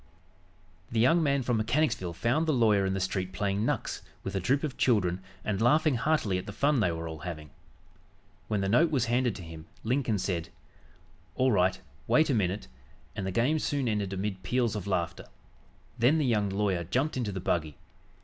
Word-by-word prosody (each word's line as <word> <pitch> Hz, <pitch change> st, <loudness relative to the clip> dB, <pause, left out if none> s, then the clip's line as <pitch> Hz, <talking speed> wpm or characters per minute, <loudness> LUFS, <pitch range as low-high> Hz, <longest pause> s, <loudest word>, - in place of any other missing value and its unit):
The 115 Hz, -, 0 dB
young 145 Hz, +9 st, +4 dB
man 140 Hz, -3 st, +1 dB
from 120 Hz, -1 st, +1 dB
Mechanicsville 110 Hz, -, 0 dB
found 125 Hz, -, 0 dB
the 155 Hz, -, +3 dB
lawyer 105 Hz, -6 st, +3 dB
in 95 Hz, -, -1 dB
the -, -, -1 dB
street 95 Hz, 0 st, -2 dB
playing 100 Hz, +2 st, -1 dB
"knucks" -, -, -2 dB, 0.2 s
with 95 Hz, -, -4 dB
a -, -, +1 dB
troop 135 Hz, -, +1 dB
of 150 Hz, -4 st, -3 dB
children 95 Hz, -7 st, +2 dB, 0.2 s
and 105 Hz, -1 st, -1 dB
laughing 150 Hz, +5 st, +4 dB
heartily 115 Hz, -7 st, +1 dB
at -, -, -9 dB
the -, -, -4 dB
fun 140 Hz, +4 st, +2 dB
they 90 Hz, -6 st, +2 dB
were 80 Hz, 0 st, -4 dB
all 80 Hz, -1 st, -7 dB
having. 75 Hz, -2 st, -7 dB, 1.0 s
When 105 Hz, -2 st, 0 dB
the 95 Hz, -, 0 dB
note 150 Hz, +12 st, +4 dB
was 135 Hz, -5 st, +1 dB
handed 120 Hz, -1 st, +1 dB
to 90 Hz, -, -8 dB
him, 80 Hz, -1 st, -10 dB, 0.2 s
Lincoln 120 Hz, -2 st, 0 dB
said: 85 Hz, -3 st, -2 dB, 0.9 s
"All 130 Hz, 0 st, +3 dB
right, 95 Hz, -2 st, +2 dB, 0.3 s
wait 155 Hz, -1 st, +4 dB
a -, -, +2 dB
minute," 100 Hz, -, -1 dB, 0.5 s
and 95 Hz, -, -3 dB
the -, -, -2 dB
game 130 Hz, +10 st, +2 dB
soon 140 Hz, -3 st, -1 dB
ended 105 Hz, -3 st, -1 dB
amid 95 Hz, 0 st, -3 dB
peals 120 Hz, +3 st, 0 dB
of 100 Hz, -2 st, -4 dB
laughter. 90 Hz, -4 st, -2 dB, 0.7 s
Then 125 Hz, +7 st, +4 dB
the 155 Hz, -, +1 dB
young 105 Hz, -5 st, +1 dB
lawyer 95 Hz, -3 st, 0 dB
jumped 130 Hz, -, -1 dB
into 120 Hz, -5 st, -2 dB
the 95 Hz, -, -4 dB
buggy. 80 Hz, -4 st, -1 dB
105 Hz, 195 wpm, -29 LUFS, 95-130 Hz, 1.0 s, young